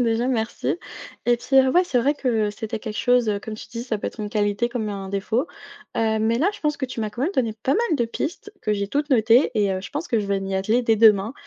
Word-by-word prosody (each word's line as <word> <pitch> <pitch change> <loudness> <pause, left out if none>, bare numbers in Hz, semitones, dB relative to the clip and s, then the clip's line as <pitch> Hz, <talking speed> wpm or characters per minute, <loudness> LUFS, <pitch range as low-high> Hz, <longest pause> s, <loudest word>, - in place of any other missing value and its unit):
déjà, 235 0 +1
merci 235 +4 -1 0.5
et 240 0 +4
puis, 270 +3 -1
heu, 265 0 +6
ouais 360 +4 +4
c'est 250 -8 +1
vrai 285 +5 +2
que 225 -7 0
c'était 220 +1 -5
quelque 210 - -6
chose, 245 -2 +3
heu, 205 - +1
comme 215 +1 -7
tu - - -10
dis 235 0 -6
ça 225 -4 -1
peut - - -5
être - - -15
une 210 - -3
qualité 205 +2 0
comme 235 -3 -3
un 195 -2 -5
défaut. 215 +8 -1 0.5
Heu, 220 -1 +1
mais 225 +2 +1
là 330 +9 +3
je - - -11
pense 300 -1 0
que 265 - -3
tu 250 -2 -5
m'as 215 -1 -2
quand 245 +4 -5
même 340 - +1
donné 230 - 0
pas 270 - +2
mal 440 -8 +1
de 235 - +1
pistes 345 - -5
que 215 - 0
j'ai 200 -1 -2
toutes 290 +6 -1
notées 235 +2 +4
et 205 -2 +2
heu, 185 - -2
je - - -9
pense 300 +4 -4
que 230 - +2
je 205 - -2
vais 200 -1 0
m'y 195 0 -3
atteler 220 +6 +1
dès 225 -2 +3
demain. 215 0 +5
230 Hz, 285 wpm, -23 LUFS, 210-260 Hz, 0.5 s, heu